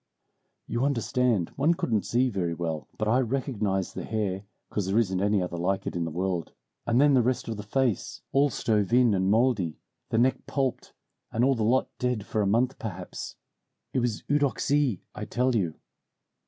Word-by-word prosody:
"You 120 Hz, -, -1 dB
understand, 125 Hz, -, +1 dB
one 155 Hz, +5 st, +3 dB
couldn't 110 Hz, -9 st, 0 dB
see 125 Hz, +2 st, +2 dB
very 90 Hz, -5 st, -1 dB
well; 80 Hz, -2 st, -3 dB
but 110 Hz, -, -1 dB
I 120 Hz, +4 st, +4 dB
recognized 110 Hz, -7 st, -1 dB
the -, -, -5 dB
hair 100 Hz, -3 st, -2 dB, 0.3 s
'cause 100 Hz, -3 st, -1 dB
there 95 Hz, +3 st, +1 dB
isn't 95 Hz, -5 st, +2 dB
any 100 Hz, -1 st, +2 dB
other 90 Hz, -1 st, -4 dB
like 95 Hz, +3 st, 0 dB
it -, -, -4 dB
in 85 Hz, -1 st, -1 dB
the -, -, -2 dB
world, 90 Hz, +1 st, -2 dB, 0.3 s
and 120 Hz, +1 st, +3 dB
then 145 Hz, 0 st, +5 dB
the 130 Hz, -, +5 dB
rest 125 Hz, +1 st, 0 dB
of 115 Hz, -, -2 dB
the 105 Hz, -, -5 dB
face, 120 Hz, +1 st, -1 dB
all 140 Hz, +1 st, +4 dB
stove 105 Hz, -5 st, 0 dB
in 125 Hz, -3 st, +5 dB
and 95 Hz, 0 st, +1 dB
moldy, 110 Hz, -7 st, +2 dB, 0.3 s
the 115 Hz, -, 0 dB
neck 130 Hz, +2 st, +2 dB
pulped, 135 Hz, -3 st, -2 dB, 0.4 s
and 115 Hz, -, +1 dB
all 135 Hz, +1 st, +5 dB
the 115 Hz, -, -3 dB
lot 120 Hz, +5 st, +3 dB
dead 125 Hz, -5 st, -1 dB
for 110 Hz, -, -1 dB
a 100 Hz, -, +1 dB
month 120 Hz, +6 st, +1 dB
perhaps. 95 Hz, -5 st, -6 dB, 0.6 s
It 130 Hz, -, +2 dB
was 120 Hz, -3 st, -1 dB
Eudoxie, 140 Hz, -5 st, +1 dB
I 105 Hz, -, -5 dB
tell 125 Hz, +3 st, +1 dB
you. 90 Hz, -8 st, 0 dB
110 Hz, 190 wpm, -27 LUFS, 95-130 Hz, 0.6 s, then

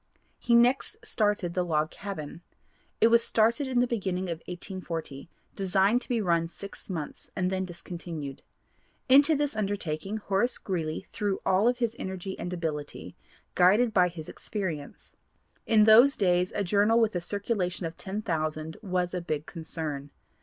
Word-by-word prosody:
He 235 Hz, -, +2 dB
next 250 Hz, -, +3 dB
started 205 Hz, -, 0 dB
the 180 Hz, -, +1 dB
Log 155 Hz, -2 st, 0 dB
Cabin. 170 Hz, -5 st, -7 dB, 0.6 s
It 225 Hz, -, +6 dB
was 235 Hz, 0 st, +5 dB
started 235 Hz, +6 st, +2 dB
in 250 Hz, -2 st, +2 dB
the -, -, +4 dB
beginning 190 Hz, -6 st, -2 dB
of 165 Hz, -, -4 dB
1840, 175 Hz, -5 st, -6 dB, 0.3 s
designed 195 Hz, +4 st, +2 dB
to -, -, -9 dB
be 240 Hz, -2 st, +1 dB
run 170 Hz, -4 st, +1 dB
six 200 Hz, +5 st, -10 dB
months 160 Hz, -5 st, -4 dB
and 185 Hz, 0 st, 0 dB
then 190 Hz, 0 st, -1 dB
discontinued. 170 Hz, -5 st, -7 dB, 0.7 s
Into 285 Hz, +4 st, +7 dB
this 290 Hz, -3 st, -1 dB
undertaking 200 Hz, -2 st, -2 dB
Horace 205 Hz, +3 st, 0 dB
Greeley 160 Hz, -5 st, -3 dB
threw 205 Hz, -3 st, -1 dB
all 200 Hz, +6 st, +4 dB
his 235 Hz, -2 st, -2 dB
energy 190 Hz, 0 st, -5 dB
and 175 Hz, -, -4 dB
ability, 155 Hz, -4 st, -5 dB, 0.4 s
guided 210 Hz, +6 st, +4 dB
by 180 Hz, -3 st, +5 dB
his 170 Hz, -3 st, -8 dB
experience. 170 Hz, -9 st, -6 dB, 0.5 s
In 220 Hz, -2 st, +5 dB
those 235 Hz, +6 st, +7 dB
days 180 Hz, -2 st, +2 dB
a 205 Hz, -, 0 dB
journal 205 Hz, +4 st, +3 dB
with 220 Hz, -4 st, +2 dB
a 175 Hz, -, 0 dB
circulation 195 Hz, -1 st, -2 dB
of 165 Hz, 0 st, -5 dB
ten 205 Hz, +4 st, -5 dB
thousand 155 Hz, -3 st, -2 dB
was 180 Hz, -3 st, -1 dB
a 180 Hz, -, -2 dB
big 155 Hz, -3 st, -3 dB
concern. 155 Hz, -4 st, -5 dB
190 Hz, 155 wpm, -28 LUFS, 170-220 Hz, 0.7 s, Into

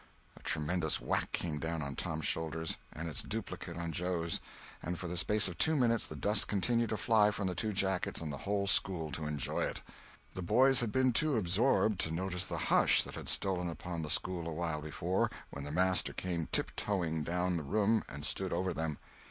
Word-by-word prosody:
A -, -, -15 dB
tremendous 80 Hz, +1 st, 0 dB
whack -, -, -1 dB
came 80 Hz, -4 st, -2 dB
down 80 Hz, 0 st, -3 dB
on 70 Hz, -1 st, -5 dB
Tom's 80 Hz, +3 st, -2 dB
shoulders, 80 Hz, 0 st, -1 dB
and 80 Hz, +2 st, -5 dB
its 75 Hz, -, -4 dB
duplicate 100 Hz, -5 st, -5 dB
on 85 Hz, -1 st, -3 dB
Joe's; 85 Hz, 0 st, -1 dB, 0.4 s
and 90 Hz, +1 st, -3 dB
for 90 Hz, -, -5 dB
the 90 Hz, -, -4 dB
space 105 Hz, +4 st, +3 dB
of 85 Hz, -2 st, -7 dB
two 160 Hz, 0 st, +5 dB
minutes 115 Hz, -5 st, +2 dB
the -, -, -7 dB
dust 105 Hz, +1 st, +1 dB
continued 115 Hz, +3 st, +1 dB
to 110 Hz, -, -1 dB
fly 105 Hz, -2 st, +4 dB
from 100 Hz, -1 st, -3 dB
the 90 Hz, -, 0 dB
two 105 Hz, +5 st, 0 dB
jackets 95 Hz, -2 st, 0 dB
and 75 Hz, -3 st, -4 dB
the 70 Hz, -, -6 dB
whole 100 Hz, 0 st, -1 dB
school 85 Hz, -5 st, +2 dB
to 75 Hz, +2 st, -4 dB
enjoy 75 Hz, -3 st, -2 dB
it. -, -, -2 dB, 0.5 s
The 95 Hz, -, -5 dB
boys 130 Hz, +9 st, +5 dB
had 115 Hz, -3 st, +1 dB
been 130 Hz, 0 st, +3 dB
too 150 Hz, +4 st, +4 dB
absorbed 105 Hz, +2 st, +2 dB
to -, -, 0 dB
notice 90 Hz, +1 st, -2 dB
the -, -, -3 dB, 0.2 s
hush -, -, +5 dB
that -, -, -9 dB
had -, -, -6 dB
stolen 90 Hz, -3 st, 0 dB
upon 85 Hz, +1 st, -5 dB
the 75 Hz, -, -5 dB
school 85 Hz, +1 st, 0 dB
awhile 80 Hz, -1 st, -2 dB
before 85 Hz, +5 st, -1 dB, 0.2 s
when 70 Hz, 0 st, -6 dB
the 75 Hz, -, -5 dB
master 90 Hz, +3 st, +2 dB
came 85 Hz, -3 st, -2 dB
tiptoeing 85 Hz, -6 st, 0 dB
down 90 Hz, +2 st, 0 dB
the -, -, -2 dB
room 105 Hz, +8 st, +2 dB
and 70 Hz, +1 st, -7 dB
stood -, -, -1 dB
over 95 Hz, -1 st, 0 dB
them. 80 Hz, -3 st, -3 dB
90 Hz, 205 wpm, -33 LUFS, 80-100 Hz, 0.5 s, two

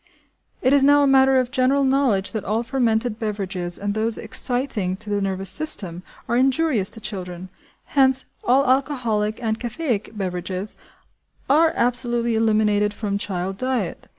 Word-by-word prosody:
It 260 Hz, +1 st, +3 dB
is 280 Hz, -1 st, +4 dB
now 290 Hz, +1 st, +5 dB
a -, -, +3 dB
matter 265 Hz, 0 st, +5 dB
of 255 Hz, -1 st, 0 dB
general 270 Hz, +1 st, +2 dB
knowledge 265 Hz, -8 st, +1 dB
that 220 Hz, -4 st, -4 dB
all 220 Hz, +3 st, -1 dB
fermented 235 Hz, -3 st, 0 dB
beverages, 195 Hz, -5 st, -2 dB
and 200 Hz, 0 st, -3 dB
those 220 Hz, +1 st, +1 dB
exciting 230 Hz, -5 st, -2 dB
to 210 Hz, -, -5 dB
the 205 Hz, 0 st, 0 dB
nervous 195 Hz, -1 st, -1 dB
system, 190 Hz, -, 0 dB, 0.3 s
are 235 Hz, -, 0 dB
injurious 260 Hz, -4 st, +2 dB
to -, -, -9 dB
children; 185 Hz, -4 st, -6 dB, 0.4 s
hence, 265 Hz, -1 st, +3 dB, 0.2 s
all 265 Hz, +3 st, +3 dB
alcoholic 250 Hz, -6 st, 0 dB
and 220 Hz, -1 st, -1 dB
caffeic 240 Hz, -4 st, -3 dB
beverages 185 Hz, +1 st, -4 dB, 0.7 s
are 315 Hz, +4 st, +4 dB
absolutely 240 Hz, -1 st, +1 dB
eliminated 215 Hz, -2 st, +1 dB
from 200 Hz, -2 st, -3 dB
child 190 Hz, -1 st, -3 dB
diet. 255 Hz, -8 st, -2 dB
225 Hz, 150 wpm, -22 LUFS, 200-265 Hz, 0.7 s, now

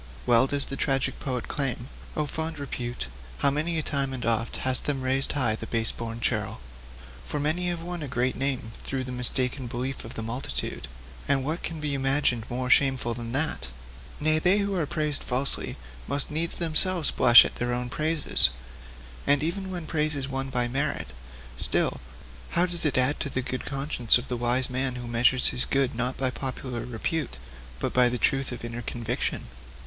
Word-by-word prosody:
Well 120 Hz, +2 st, +5 dB
does 140 Hz, 0 st, +1 dB
the 135 Hz, -, -4 dB
tragic 135 Hz, -1 st, 0 dB
poet 130 Hz, -4 st, -3 dB
exclaim: 130 Hz, -4 st, -2 dB, 0.3 s
'"Oh, 150 Hz, -, +1 dB
fond 160 Hz, +2 st, -3 dB
Repute, 125 Hz, -, -4 dB, 0.3 s
how 140 Hz, -, +4 dB
many 160 Hz, +4 st, 0 dB
a 155 Hz, -, 0 dB
time 140 Hz, -3 st, -1 dB
and 125 Hz, -2 st, -4 dB
oft 115 Hz, 0 st, 0 dB
Hast 130 Hz, -1 st, +2 dB
them 135 Hz, -3 st, -1 dB
raised 135 Hz, +1 st, +2 dB
high 130 Hz, -6 st, +1 dB
in 110 Hz, -, -2 dB
pride -, -, -16 dB
the -, -, -6 dB
base 115 Hz, -1 st, +1 dB
born 115 Hz, 0 st, -6 dB
churl!" -, -, -1 dB, 0.6 s
For 150 Hz, -, -4 dB
many 160 Hz, +5 st, +1 dB
have 175 Hz, -1 st, -2 dB
won 175 Hz, -1 st, -4 dB
a 145 Hz, -, -4 dB
great 125 Hz, 0 st, 0 dB
name 130 Hz, -4 st, -1 dB
through 135 Hz, -1 st, -3 dB
the 125 Hz, -, -6 dB
mistaken 125 Hz, +1 st, +3 dB
beliefs 125 Hz, +3 st, -4 dB
of 115 Hz, -, -9 dB
the 115 Hz, -, -4 dB
multitude 115 Hz, +4 st, -4 dB, 0.4 s
and 135 Hz, -1 st, +3 dB
what 160 Hz, +4 st, -2 dB
can 165 Hz, -1 st, -4 dB
be 150 Hz, -1 st, -2 dB
imagined 135 Hz, -4 st, +1 dB
more 125 Hz, +1 st, -2 dB
shameful 130 Hz, -2 st, +3 dB
than 115 Hz, 0 st, -6 dB
that? 145 Hz, -, +1 dB, 0.5 s
Nay, 155 Hz, +1 st, +2 dB
they 180 Hz, +5 st, +4 dB
who 200 Hz, -1 st, 0 dB
are 170 Hz, -6 st, 0 dB
praised 150 Hz, -2 st, -1 dB
falsely 130 Hz, +2 st, -2 dB, 0.3 s
must 140 Hz, +2 st, 0 dB
needs 165 Hz, +2 st, 0 dB
themselves 170 Hz, 0 st, +4 dB
blush 120 Hz, -1 st, +8 dB
at -, -, -5 dB
their 120 Hz, 0 st, -1 dB
own 125 Hz, 0 st, -2 dB
praises! 155 Hz, +3 st, +2 dB, 0.8 s
And 145 Hz, +1 st, +5 dB
even 190 Hz, +4 st, -2 dB
when 175 Hz, -3 st, -5 dB
praise 155 Hz, -1 st, 0 dB
is 135 Hz, -1 st, -3 dB
won 135 Hz, 0 st, -3 dB
by 125 Hz, -2 st, 0 dB
merit, 135 Hz, -, -2 dB, 0.4 s
still, -, -, 0 dB, 0.6 s
how 175 Hz, -, +5 dB
does 175 Hz, -2 st, 0 dB
it 145 Hz, -, +1 dB
add 130 Hz, +3 st, +3 dB
to 140 Hz, -, -2 dB
the 130 Hz, -1 st, -2 dB
good 130 Hz, 0 st, -4 dB
conscience 135 Hz, -4 st, +3 dB
of 125 Hz, -, -8 dB
the 125 Hz, -, -1 dB
wise 120 Hz, +2 st, +1 dB
man 130 Hz, 0 st, -1 dB
who 120 Hz, -1 st, -6 dB
measures 120 Hz, +2 st, +3 dB
his 125 Hz, -, +2 dB
good 135 Hz, -1 st, +1 dB
not 125 Hz, +2 st, -2 dB
by 130 Hz, -1 st, 0 dB
popular 130 Hz, -1 st, -5 dB
repute, 125 Hz, -, -3 dB, 0.4 s
but -, -, -2 dB
by 125 Hz, -1 st, +5 dB
the 125 Hz, -, -2 dB
truth 135 Hz, +1 st, +1 dB
of 120 Hz, -1 st, -6 dB
inner 120 Hz, +1 st, -5 dB
conviction? 120 Hz, 0 st, -2 dB
135 Hz, 195 wpm, -26 LUFS, 125-150 Hz, 0.8 s, blush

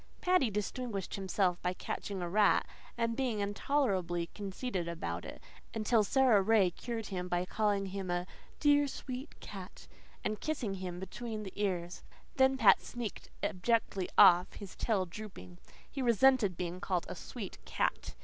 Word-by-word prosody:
Paddy 360 Hz, -9 st, +3 dB
distinguished 210 Hz, 0 st, -3 dB
himself 190 Hz, -2 st, 0 dB
by 180 Hz, 0 st, 0 dB
catching 190 Hz, 0 st, -4 dB
a -, -, -2 dB
rat, 205 Hz, +3 st, +4 dB, 0.3 s
and 230 Hz, -1 st, 0 dB
being 245 Hz, -5 st, -1 dB
intolerably 200 Hz, -6 st, 0 dB
conceited 195 Hz, -2 st, -3 dB
about 90 Hz, -, -4 dB
it -, -, -8 dB, 0.4 s
until 220 Hz, 0 st, +3 dB
Sara 245 Hz, -1 st, +4 dB
Ray 200 Hz, -3 st, +4 dB
cured 230 Hz, +4 st, -5 dB
him 180 Hz, -2 st, -3 dB
by 175 Hz, 0 st, 0 dB
calling 205 Hz, 0 st, +1 dB
him 190 Hz, -1 st, -5 dB
a 175 Hz, 0 st, 0 dB, 0.3 s
"dear, 290 Hz, -1 st, +4 dB
sweet 260 Hz, 0 st, -7 dB
cat," 190 Hz, -2 st, -9 dB, 0.4 s
and 215 Hz, 0 st, -2 dB
kissing 280 Hz, -10 st, -2 dB
him 185 Hz, -2 st, -5 dB
between 215 Hz, +3 st, -5 dB
the 190 Hz, -, -8 dB
ears. 185 Hz, -3 st, -2 dB, 0.4 s
Then 265 Hz, 0 st, +5 dB
Pat -, -, +6 dB
sneaked 240 Hz, -3 st, -6 dB
abjectly 200 Hz, -1 st, 0 dB
off, 175 Hz, +1 st, +7 dB
his 200 Hz, -3 st, -9 dB
tail 205 Hz, -5 st, +1 dB
drooping. 170 Hz, -, -10 dB, 0.3 s
He 275 Hz, -, -5 dB
resented 235 Hz, -5 st, +4 dB
being 180 Hz, 0 st, -3 dB
called 180 Hz, -3 st, -1 dB
a -, -, -5 dB
sweet -, -, -8 dB
cat. -, -, -1 dB
200 Hz, 150 wpm, -33 LUFS, 180-235 Hz, 0.4 s, off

